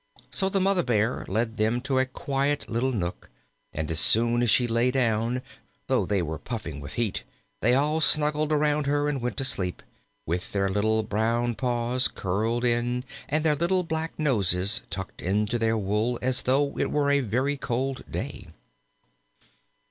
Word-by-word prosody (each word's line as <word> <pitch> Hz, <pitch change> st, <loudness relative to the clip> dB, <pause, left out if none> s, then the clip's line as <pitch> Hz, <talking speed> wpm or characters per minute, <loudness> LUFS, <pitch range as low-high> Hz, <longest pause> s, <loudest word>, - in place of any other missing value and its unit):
So 190 Hz, -1 st, +1 dB
the 195 Hz, -, +1 dB
Mother 190 Hz, -1 st, +3 dB
bear 115 Hz, -2 st, 0 dB
led 110 Hz, +3 st, -1 dB
them 110 Hz, +3 st, +1 dB
to 135 Hz, 0 st, 0 dB
a 130 Hz, -, +1 dB
quiet 135 Hz, -1 st, -1 dB
little 120 Hz, +4 st, 0 dB
nook, 90 Hz, -7 st, -4 dB, 0.4 s
and 80 Hz, +1 st, -4 dB
as 80 Hz, -, +1 dB
soon 120 Hz, +5 st, +4 dB
as 120 Hz, -, +2 dB
she 125 Hz, -, +5 dB
lay 115 Hz, +2 st, +2 dB
down, 125 Hz, -1 st, 0 dB, 0.4 s
though -, -, +1 dB
they 100 Hz, -4 st, +1 dB
were 80 Hz, -1 st, -4 dB
puffing 105 Hz, -, -6 dB
with 70 Hz, -, -8 dB
heat, 115 Hz, -5 st, -1 dB, 0.4 s
they 120 Hz, +3 st, +3 dB
all 150 Hz, +4 st, +1 dB
snuggled 150 Hz, 0 st, +3 dB
around 150 Hz, -1 st, +2 dB
her 145 Hz, +1 st, +1 dB
and 145 Hz, -3 st, -1 dB
went 120 Hz, -4 st, -3 dB
to 135 Hz, -, 0 dB
sleep, 90 Hz, -8 st, -2 dB, 0.4 s
with 90 Hz, +3 st, -3 dB
their 100 Hz, -1 st, +1 dB
little 110 Hz, +3 st, +1 dB
brown 115 Hz, +3 st, 0 dB
paws 125 Hz, +1 st, +1 dB
curled 110 Hz, +6 st, -1 dB
in, 120 Hz, +1 st, 0 dB, 0.3 s
and 155 Hz, +2 st, 0 dB
their 150 Hz, -1 st, +3 dB
little 175 Hz, +4 st, +1 dB
black 160 Hz, -1 st, -3 dB
noses 105 Hz, -, +2 dB
tucked 95 Hz, 0 st, -6 dB
into 105 Hz, +5 st, 0 dB
their 115 Hz, 0 st, +1 dB
wool 105 Hz, +4 st, 0 dB
as 130 Hz, 0 st, 0 dB
though 140 Hz, +2 st, +1 dB
it -, -, +1 dB
were 145 Hz, -1 st, +1 dB
a 140 Hz, -, +4 dB
very 130 Hz, +4 st, 0 dB
cold 135 Hz, 0 st, -2 dB
day. -, -, -5 dB
120 Hz, 170 wpm, -26 LUFS, 110-140 Hz, 0.4 s, she